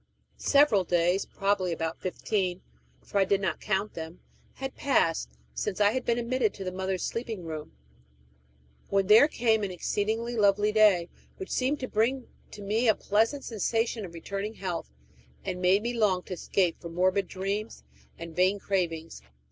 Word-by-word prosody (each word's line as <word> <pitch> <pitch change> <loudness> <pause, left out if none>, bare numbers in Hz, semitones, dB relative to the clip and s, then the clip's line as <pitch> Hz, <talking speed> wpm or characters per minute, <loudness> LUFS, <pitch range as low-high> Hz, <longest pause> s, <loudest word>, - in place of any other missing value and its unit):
Several 280 -9 +4
days 175 +2 +1
probably 195 -2 0
about 165 0 -3
fifteen, 185 0 -2 0.4
for 200 - -1
I - - +6
did 195 +1 +2
not 190 -3 -2
count 205 0 -1
them 160 +1 -7 0.4
had 270 0 -5
passed 165 - +1 0.2
since 60 - -3
I 205 0 +5
had 255 +1 -2
been 235 0 +1
admitted 240 -2 0
into 195 - -7
the 185 - -3
mother's 190 0 -2
sleeping 230 -5 -4
room, 155 -2 -7 1.2
when 195 -1 +2
there 215 +8 +7
came 225 -7 +1
an 200 - -1
exceedingly 220 +6 -2
lovely 205 -1 +3
day, 210 -5 +5 0.3
which 380 - -7
seemed 270 +3 0
to 255 - -2
bring 240 +4 0 0.2
to 205 - -10
me 220 +5 +1
a 220 - +5
pleasant 225 +7 +1
sensation 225 0 -1
of 170 -3 -8
returning 200 +5 -5
health, 180 - -4 0.6
and 180 -2 -3
made 190 +3 +4
me 240 +1 -1
long 200 -6 +2
to - - -6
escape 180 -1 0
from 170 -1 -8
morbid 185 +2 +2
dreams 200 +3 -4 0.3
and 165 -1 -8
vain 185 +3 +3
cravings. 170 - -2
200 Hz, 165 wpm, -28 LUFS, 180-225 Hz, 1.2 s, there